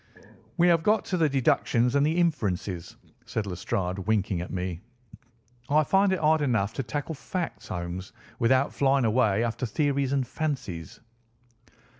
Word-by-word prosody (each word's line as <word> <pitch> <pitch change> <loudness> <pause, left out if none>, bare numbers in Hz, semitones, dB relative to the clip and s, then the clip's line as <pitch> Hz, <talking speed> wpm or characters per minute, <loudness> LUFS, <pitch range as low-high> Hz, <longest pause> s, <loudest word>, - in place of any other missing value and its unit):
"We 175 0 +5
have 165 -2 +4
got 210 +5 +2
to 185 - -1
the 160 -3 +3
deductions 125 -2 +2
and 140 0 +3
the 155 +3 +1
inferences," 100 - -1 0.3
said 110 - -2
Lestrade, 95 0 -2
winking 95 -2 0
at 90 - -6
me. 90 -2 -4 0.9
"I 155 +2 +4
find 195 +6 +3
it 190 - +2
hard 155 -1 +3
enough 115 -7 +1
to - - -2
tackle 145 +5 -4
facts, 155 - -5
Holmes, 90 +2 -5 0.3
without 130 +4 +3
flying 135 -2 +2
away 110 -2 +2
after 120 +2 -2
theories 140 +2 0
and 135 -2 +1
fancies." 125 - -4
125 Hz, 150 wpm, -27 LUFS, 100-150 Hz, 0.9 s, We